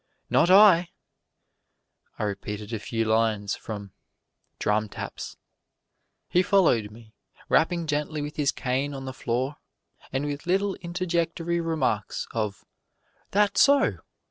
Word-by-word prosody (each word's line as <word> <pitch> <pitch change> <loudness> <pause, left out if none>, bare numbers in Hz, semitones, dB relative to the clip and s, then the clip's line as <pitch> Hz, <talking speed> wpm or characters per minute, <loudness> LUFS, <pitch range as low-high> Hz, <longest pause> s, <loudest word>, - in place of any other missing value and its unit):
"Not 175 - +4
I!" 185 -3 +7 1.3
I - - -3
repeated 105 +1 -4
a 110 - -2
few 115 +1 -2
lines 110 -2 +1
from 100 -3 -7 0.7
"Drum 105 0 0
Taps." - - -7 0.9
He 180 - +3
followed 170 - +3
me, 110 0 -16 0.4
rapping 170 +1 +2
gently 150 0 -2
with 150 +1 -6
his 145 -2 +1
cane 135 +2 -2
on 135 0 -6
the 130 - -5
floor, 130 +3 -2 0.5
and 135 +2 -1
with 145 +2 -5
little 195 +2 +2
interjectory 170 -1 -1
remarks 145 -11 -1
of 105 -3 -3 0.6
"That's 205 +1 +3
so!" 280 0 +4
140 Hz, 120 wpm, -26 LUFS, 110-170 Hz, 1.3 s, I